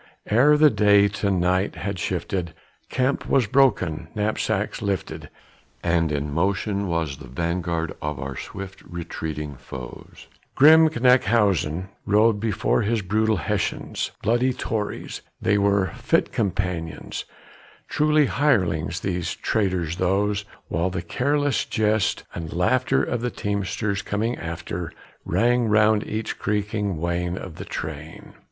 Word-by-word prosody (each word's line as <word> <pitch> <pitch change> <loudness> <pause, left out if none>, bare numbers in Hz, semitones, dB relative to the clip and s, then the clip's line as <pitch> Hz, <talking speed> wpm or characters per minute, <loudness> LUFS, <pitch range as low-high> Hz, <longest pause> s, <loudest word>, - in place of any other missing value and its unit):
Ere 140 +7 +5
the 150 0 +6
day 100 -1 +5
to 100 0 -2
night 95 +1 +1
had - - -4
shifted, 85 -4 -3 0.3
camp 130 +2 0
was 135 -4 +4
broken, 100 - +2
knapsacks 105 +1 -1
lifted, 100 -3 -3 0.5
And 85 -2 +2
in 75 0 -2
motion 100 +4 0
was 80 -5 -1
the 65 - -11
vanguard 85 +3 -2
of 75 -2 -3
our 65 0 -5
swift 95 +6 -8
retreating 80 -4 -6
foes; 65 -1 -10 0.3
Grim 160 +3 +7
Knyphausen 105 - +2 0.2
rode 105 +1 +4
before 110 +1 +1
his 110 0 0
brutal 110 +3 +1
Hessians, 85 - -2
bloody 120 +4 +2
Tories 110 -4 -4 0.2
They 105 -2 +2
were 100 -3 +2
fit - - +1
companions, 90 -5 -3 0.6
truly, 150 0 +3
hirelings 90 - +1
these 90 -3 -2
and - - -29
traitors 90 -5 0
those 100 +2 +1 0.2
While 85 +3 0
the 90 -2 -4
careless 145 - 0
jest 110 -1 0
and 80 -2 -6
laughter 130 +10 +2
of 120 - -2
the 125 - -1
teamsters 100 -1 -2
coming 110 +4 -1
after 85 0 -5 0.3
Rang 120 0 +2
around 110 0 +4
each 110 +1 -4
creaking 105 -2 -1
wain 85 +2 -2
of 90 -5 -8
the - - -7
train. 80 +1 -7
100 Hz, 130 wpm, -24 LUFS, 85-110 Hz, 0.6 s, Grim